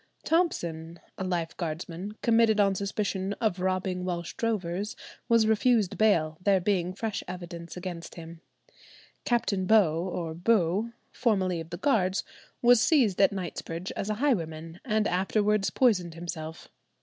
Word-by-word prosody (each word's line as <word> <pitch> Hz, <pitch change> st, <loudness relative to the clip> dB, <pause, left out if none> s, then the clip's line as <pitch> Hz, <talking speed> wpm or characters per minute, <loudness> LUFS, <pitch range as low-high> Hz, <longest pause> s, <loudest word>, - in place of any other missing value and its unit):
Thompson, 170 Hz, -, -1 dB, 0.2 s
a -, -, -2 dB
lifeguardsman, 170 Hz, +1 st, -3 dB
committed 225 Hz, -2 st, +4 dB
on 200 Hz, -1 st, +4 dB
suspicion 195 Hz, 0 st, -2 dB
of 205 Hz, -3 st, -1 dB
robbing 185 Hz, 0 st, -1 dB
Welsh 175 Hz, -2 st, -3 dB
drovers, 205 Hz, -4 st, -2 dB, 0.3 s
was 230 Hz, -1 st, +5 dB
refused 220 Hz, -2 st, +2 dB
bail, 160 Hz, -8 st, +2 dB
there 195 Hz, 0 st, +3 dB
being 180 Hz, -1 st, 0 dB
fresh 220 Hz, 0 st, -3 dB
evidence 175 Hz, -1 st, -7 dB
against 175 Hz, -2 st, -6 dB
him. 165 Hz, 0 st, -10 dB, 0.8 s
Captain 200 Hz, -6 st, 0 dB
Beau, 175 Hz, -7 st, +4 dB
or 165 Hz, -3 st, -3 dB
Bew, 195 Hz, +3 st, +1 dB, 0.2 s
formerly 190 Hz, -8 st, +1 dB
of 165 Hz, 0 st, -7 dB
the 175 Hz, -, -5 dB
Guards, 195 Hz, -5 st, +1 dB, 0.4 s
was 240 Hz, -1 st, +6 dB
seized 240 Hz, -, +3 dB
at 195 Hz, -, +5 dB
Knightsbridge 180 Hz, -1 st, -5 dB
as 200 Hz, -, -4 dB
a 215 Hz, -, 0 dB
highwayman, 165 Hz, -, -1 dB
and 215 Hz, -3 st, +1 dB
afterwards 205 Hz, +2 st, +1 dB
poisoned 185 Hz, -10 st, +2 dB
himself. 165 Hz, -2 st, -6 dB
185 Hz, 135 wpm, -28 LUFS, 170-215 Hz, 0.8 s, was